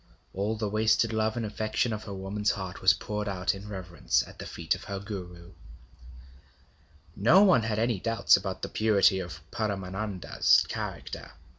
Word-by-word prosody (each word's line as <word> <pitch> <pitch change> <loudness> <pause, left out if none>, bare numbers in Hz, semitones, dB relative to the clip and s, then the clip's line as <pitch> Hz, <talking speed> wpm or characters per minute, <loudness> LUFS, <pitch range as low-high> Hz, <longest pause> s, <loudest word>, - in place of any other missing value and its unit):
All 100 +3 -1
the 105 -1 -2
wasted 110 +2 +2
love 110 +1 0
and 115 - -1
affection 110 +2 -1
of 105 - -6
her 100 - -6
woman's 100 +2 -2
heart 95 -3 -4
was - - +7
poured 105 -1 -4
out 95 -1 0
in 100 +1 -9
reverence 90 -11 -1
at - - -14
the - - -6
feet - - -1
of - - -7
her 100 - -4
Guru. 90 -4 -8 1.6
No 155 - +6
one 185 - +5
had 110 -1 -2
any 115 -2 +1
doubts 115 +1 +4
about 95 -1 -4
the - - -3
purity 100 -3 +3
of 90 -2 -7
Paramananda's 100 -2 +1
character. - - -6
105 Hz, 165 wpm, -28 LUFS, 95-110 Hz, 1.6 s, was